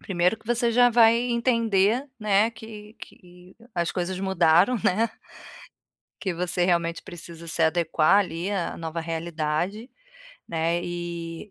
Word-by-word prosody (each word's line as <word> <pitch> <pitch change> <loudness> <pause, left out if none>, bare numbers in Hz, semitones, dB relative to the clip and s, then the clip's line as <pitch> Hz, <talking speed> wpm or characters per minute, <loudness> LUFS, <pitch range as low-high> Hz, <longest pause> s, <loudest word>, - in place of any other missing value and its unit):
primeiro 180 +2 0
que 220 - -25
você 240 0 +1
já 245 +1 +5
vai 230 0 +5
entender, 230 0 +1
né, 210 +1 +3
que 220 -1 -12
que 180 +1 -15 0.2
as 170 -1 0
coisas 185 0 -3
mudaram, 190 +3 +3
né. 220 +5 +2 1.1
Que 190 -3 -2
você 175 +1 -1
realmente 170 -2 0
precisa 170 -1 -10
se 165 0 -1
adequar 165 +2 +3
ali, 180 -1 -2
à 190 -4 -2
nova 165 0 -5
realidade, 165 - -3 0.6
né. 165 +1 0
Eh, 170 +1 -6
180 Hz, 130 wpm, -25 LUFS, 170-220 Hz, 1.1 s, já